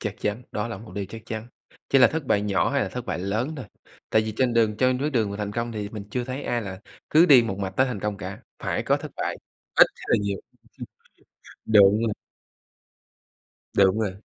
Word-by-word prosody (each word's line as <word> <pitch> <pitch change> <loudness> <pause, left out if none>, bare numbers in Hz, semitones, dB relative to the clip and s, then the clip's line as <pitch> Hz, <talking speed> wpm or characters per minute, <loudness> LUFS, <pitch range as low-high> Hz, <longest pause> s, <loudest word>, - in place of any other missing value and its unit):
Chắc 105 -2 -3
chắn, 105 +4 -2
đó 105 +2 -2
là 115 - -5
một 110 +2 -12
điều 100 - -2
chắc 110 +1 -9
chắn, 110 +1 -5 0.4
chỉ 135 - +5
là 130 - +8
thất 160 -1 -3
bại 105 - +2
nhỏ 100 -2 +1
hay - - +1
là - - -2
thất - - -6
bại - - -2
lớn 110 - -2
thôi. 130 -6 -7 0.4
Tại 110 - +4
vì 110 0 -4
trên 130 -1 +2
đường 110 -2 +3
trên 130 +1 +2
bước 145 +3 -1
đường 115 -7 +1
mà 100 - -5
thành 105 -1 -4
công 115 +1 -3
thì 105 -2 -4
mình 105 -1 -7
chưa 125 +2 -2
thấy 130 +3 -5
ai 120 -1 -1
là 95 -2 -7 0.3
cứ 160 +3 +6
đi 135 -6 +8
một 95 -4 -3
mạch 95 -1 -2
tới 130 - +4
thành 125 -6 -4
công 105 0 -2
cả, 105 - -7 0.2
phải - - -2
có - - +2
thất - - -8
bại, - - -2 0.4
ít - - +8
hay - - -11
là - - +4
nhiều. 100 -1 -1 0.4
Ừm, - - -5 0.8
đúng 105 -1 +6
luôn. 115 -2 0 1.6
Đúng 95 +1 +4
rồi. 105 -4 -1
110 Hz, 235 wpm, -25 LUFS, 100-125 Hz, 1.6 s, là